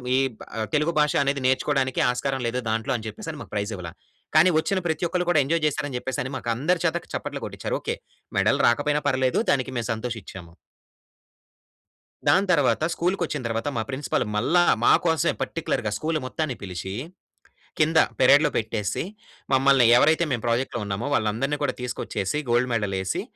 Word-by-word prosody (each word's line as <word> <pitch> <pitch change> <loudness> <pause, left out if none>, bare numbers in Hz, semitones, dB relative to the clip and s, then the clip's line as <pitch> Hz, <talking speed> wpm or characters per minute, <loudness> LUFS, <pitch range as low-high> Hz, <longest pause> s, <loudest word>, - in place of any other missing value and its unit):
ఈ - - +3 0.2
బా - - -10 0.3
తెలుగు 150 +2 +2
భాష 150 -1 +3
అనేది 140 0 -1
నేర్చుకోవడానికి 130 0 +1
ఆస్కారం 135 +1 -2
లేదు 125 +2 -1
దాంట్లో 110 +5 -1
అని 110 - -9
చెప్పేసని 150 +8 -7
మాకు - - -11
ప్రైజ్ 105 +1 -2
ఇవ్వలా. 85 -3 -7 0.4
కానీ 165 +4 +7
వచ్చిన 190 +4 0
ప్రతి 160 +2 -1
ఒక్కళ్ళు 180 0 -1
కూడా 155 -4 +4
ఎంజాయ్ 165 +3 0
చేసారని 145 -3 -2
చెప్పేసని 130 0 -3
మాకు 120 - -5
అందరి 165 +8 0
చేత 165 - +1 0.2
చప్పట్లు - - -4
కొట్టించారు. - - -4
ఓకే! - - -2 0.4
మెడల్ - - +3
రాకపోయినా 145 +5 +2
పర్లేదు, 130 -1 +1
దానికి 130 -4 0
మేము 115 -2 -2
సంతోషిచ్చాము. 110 -7 -7 1.8
దాని 195 +2 +4
తర్వాత 140 -4 +2
స్కూలుకొచ్చిన 175 -4 -1
తర్వాత 115 +4 -2
మా 110 - 0
ప్రిన్సిపల్ 130 -2 -1
మళ్ళా, 165 +11 +3 0.2
మాకోసమే 165 0 +3
పర్టిక్యులర్‌గా 120 -9 -2
స్కూల్ 155 0 -1
మొత్తాన్ని 140 -1 -3
పిలిచి, 95 0 -5 0.9
కింద 160 +1 +3 0.2
పెరేడ్‌లో 140 +4 +6
పెట్టేసి 110 -2 -2 0.5
మమ్మల్ని 135 -2 +5
ఎవరైతే 160 +5 +4
మేము 120 -3 -1
ప్రాజెక్ట్‌లో 120 +1 0
ఉన్నామో 100 +6 -3
వాళ్ళందరిని 125 +6 0
కూడా - - 0
తీసుకొచ్చేసి, 120 -1 -3
గోల్డ్ 120 +1 +2
మెడల్ 105 -4 -1
ఏసి 95 - -2
130 Hz, 155 wpm, -24 LUFS, 115-155 Hz, 1.8 s, కానీ